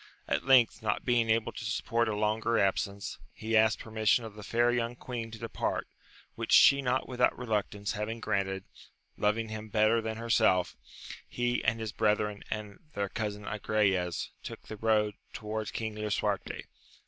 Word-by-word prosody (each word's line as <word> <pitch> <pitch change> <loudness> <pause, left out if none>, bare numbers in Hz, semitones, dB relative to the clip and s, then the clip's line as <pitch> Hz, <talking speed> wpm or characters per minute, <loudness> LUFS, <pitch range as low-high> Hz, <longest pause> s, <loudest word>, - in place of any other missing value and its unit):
At - - 0
length, 125 -4 +5
not 105 -2 -1
being 120 -2 +2
able 110 0 +2
to 115 - -8
support 115 +1 0
a 105 - -1
longer 110 +2 +1
absence, 100 +1 -1 0.2
he 110 +1 -2
asked 110 0 +5
permission 110 +1 +1
of 110 - -8
the 105 - -10
fair 120 +4 +2
young 120 0 -1
queen 120 -2 -5
to 110 - -9
depart, 115 +1 -3 0.5
which - - -5
she 140 0 +7
not 130 0 0
without 125 -1 +2
reluctance 105 -4 -2
having 110 +2 -3
granted, 95 -3 -1 0.5
loving 110 +2 0
him 110 0 -6
better 110 +2 +3
than 110 0 -4
herself, 110 -5 +2 0.5
he 120 0 -1
and 110 +1 +1
his 110 -1 -3
brethren 105 -1 0
and 105 -2 -5 0.2
their 100 -1 -1
cousin 105 -1 -4
Agrayes 100 -4 0
took - - -8
the 110 - -8
road 105 -1 +2 0.2
towards 110 0 -4
King 110 -1 -3
Lisuarte. 105 -1 -2
110 Hz, 160 wpm, -30 LUFS, 105-115 Hz, 0.5 s, she